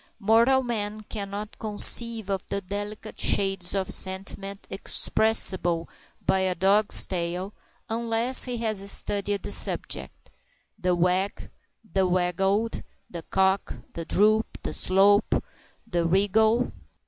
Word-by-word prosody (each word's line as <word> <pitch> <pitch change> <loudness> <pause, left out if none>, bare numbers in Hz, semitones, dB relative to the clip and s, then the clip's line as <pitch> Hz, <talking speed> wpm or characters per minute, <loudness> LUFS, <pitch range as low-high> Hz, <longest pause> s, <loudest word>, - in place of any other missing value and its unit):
Mortal 230 +5 +3
man 215 -3 -4
cannot 205 0 -7
conceive 220 0 +3
of 195 -2 -2
the 200 - -3
delicate 205 +3 -7
shades 195 -2 0
of 190 -1 -2
sentiment 195 +1 -1
expressible 185 -4 +2 0.4
by 190 - +1
a 185 -1 -1
dog's 200 +4 +5
tail, 180 +2 -4 0.3
unless 230 +2 +2
he 250 -1 -4
has 215 -4 -2
studied 200 -1 -1
the - - -6
subject - - 0 0.5
the 180 -2 0
wag, 180 +3 -1 0.4
the 190 -1 +1
waggle, 190 +5 0 0.4
the 170 - -6
cock, 190 +3 -1 0.2
the 170 - -6
droop, 215 +6 +2 0.2
the - - -4
slope, 200 +3 +3 0.5
the 175 -2 -2
wriggle! 220 +6 +1
200 Hz, 115 wpm, -25 LUFS, 190-215 Hz, 0.5 s, dog's